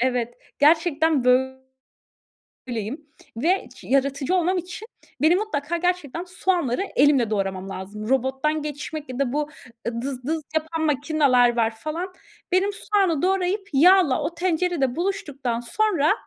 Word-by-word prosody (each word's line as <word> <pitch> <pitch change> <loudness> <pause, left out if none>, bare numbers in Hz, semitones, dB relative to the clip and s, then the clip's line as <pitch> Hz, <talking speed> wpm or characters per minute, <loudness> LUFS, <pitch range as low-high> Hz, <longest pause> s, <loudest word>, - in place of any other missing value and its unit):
Evet. 245 -1 0 0.2
Gerçekten 315 -2 +3
böyleyim 260 +1 0 1.5
ve 345 +11 +1 0.2
yaratıcı 275 +4 0
olmam 365 +1 +2
için 370 +5 -7 0.3
benim 330 +4 +5
mutlaka 340 -6 -2
gerçekten 350 -2 -2
soğanları 355 -6 0
elimle 270 -5 +4
doğramam 195 -2 -2
lazım. 205 +3 -7
Robottan 265 +4 0
geçmek 295 0 -6
ya 255 - -6
da 270 -3 0
bu 300 +1 -1 0.5
dız 260 -2 -5
dız 320 +1 -1
yapan 315 +1 -1
makineler 280 -5 +3
var, 225 -1 +1
falan. 330 +9 -5 0.4
Benim 375 +2 +3
soğanı 390 -7 0
doğrayıp 385 +2 0
yağla 330 -1 +5
o 340 - -3
tencerede 340 -6 0
buluştuktan 290 - -2
sonra 320 - +1
300 Hz, 120 wpm, -23 LUFS, 260-355 Hz, 1.5 s, benim